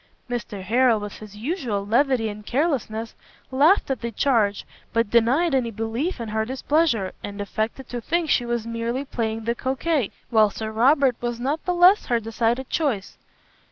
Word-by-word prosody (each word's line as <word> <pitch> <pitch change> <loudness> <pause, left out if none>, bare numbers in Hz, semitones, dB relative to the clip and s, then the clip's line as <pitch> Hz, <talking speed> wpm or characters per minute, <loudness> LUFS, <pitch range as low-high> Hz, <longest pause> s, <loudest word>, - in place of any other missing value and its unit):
Mr 235 -5 -5
Harrel, 235 +3 +3
with 205 -1 -7
his 210 -1 -11
usual 235 - -2
levity 240 +1 +2
and 210 0 -7
carelessness, 235 -4 -1 0.4
laughed 290 +5 +4
at 265 - -2
the 235 - -2
charge, 220 -5 +1 0.3
but 230 -2 +1
denied 255 +8 +3
any 255 -3 +1
belief 225 - -3
in 230 -2 -5
her 220 +1 0
displeasure, 260 - 0
and 205 0 -6
affected 220 +5 -3
to 245 -1 -5
think 335 +6 0
she 260 - +2
was 235 -2 -2
merely 230 +3 -3
playing 225 -3 -3
the 235 +1 0
coquet, 265 0 -1 0.2
while 215 -2 +5
Sir 220 +1 -5
Robert 260 +3 +4
was 240 -1 -3
not 280 +6 -2
the 360 - +1
less 360 +4 +5
her 240 -1 +2
decided 230 +3 -1
choice. 255 -12 -2
235 Hz, 170 wpm, -23 LUFS, 220-270 Hz, 0.4 s, while